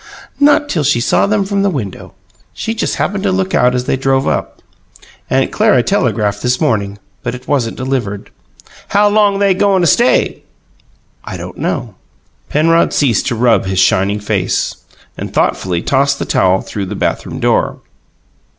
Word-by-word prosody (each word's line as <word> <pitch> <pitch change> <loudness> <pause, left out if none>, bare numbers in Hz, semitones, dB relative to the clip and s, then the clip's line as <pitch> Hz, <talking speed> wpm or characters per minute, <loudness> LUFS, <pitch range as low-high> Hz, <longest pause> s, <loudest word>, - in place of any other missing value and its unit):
"Not 290 +1 +4
till 165 - -1
she 140 -4 +2
saw 120 - +2
them 205 -1 +1
from 200 0 -1
the 200 - +2
window. 120 - -6 0.4
She 225 - -3
just 225 - -2
happened 205 -1 -2
to 200 -1 0
look 190 0 -1
out 125 0 +3
as 125 - -1
they 130 - -1
drove 135 0 +1
up. - - -3 0.7
Aunt - - +1
Clara - - +3
telegraphed 105 -1 0
this 125 0 0
morning, 100 -3 0 0.2
but 120 - -4
it 125 - -12
wasn't 125 -6 -1
delivered." 125 -6 -3 0.6
"How 205 +1 +3
long 205 -1 +3
they 200 -1 +3
goin' 195 0 +2
to - - +2
stay?" 240 - +2 0.8
"I - - -7
don't - - -8
know." - - -3 0.6
Penrod 165 +2 +2
ceased 125 -9 +1
to - - -1
rub 115 -4 +2
his 95 0 -2
shining 95 +2 +2
face, 105 -3 -1 0.4
and - - -5
thoughtfully 90 -2 0
tossed 140 +1 +1
the - - -3
towel 95 0 +2
through 100 -2 -5
the - - -5
bathroom - - -3
door. - - +1
135 Hz, 170 wpm, -15 LUFS, -, 0.8 s, Not